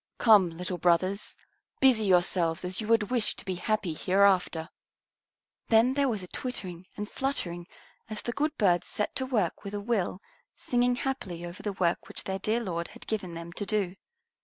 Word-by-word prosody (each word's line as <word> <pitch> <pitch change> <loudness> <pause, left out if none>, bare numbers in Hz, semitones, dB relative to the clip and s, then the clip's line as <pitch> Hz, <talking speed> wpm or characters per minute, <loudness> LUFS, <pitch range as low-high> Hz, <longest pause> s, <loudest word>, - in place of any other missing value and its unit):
Come, 210 -6 +6
little 180 0 -4
brothers, 185 +4 +1 0.4
busy 250 -5 +5
yourselves 175 -2 +2
as 185 +4 -3
you 215 - -5
would 225 0 +3
wish 240 -4 +1
to - - -9
be 190 - -1
happy 185 -1 -1
hereafter." 185 -2 +2 1.0
Then 230 +3 +5
there 280 -1 +2
was 215 -5 -1
a - - -8
twittering 185 -8 -5
and 210 0 -3
fluttering 180 -11 -3 0.4
as 215 -1 -5
the 240 - -2
good 300 +5 -1
birds 180 -5 +3
set 210 - -2
to 260 - -2
work 215 -10 0
with 200 +1 -5
a - - -2
will, 200 -4 -1 0.4
singing 245 0 +1
happily 205 -11 -3
over 175 +1 -8
the 205 - -3
work 175 -3 0
which - - -7
their 190 0 -3
dear 220 +5 0
Lord 170 -4 -3
had - - -13
given 190 -6 -3
them 170 +1 -7
to 205 - -4
do. 200 -4 0
200 Hz, 185 wpm, -29 LUFS, 180-225 Hz, 1.0 s, Come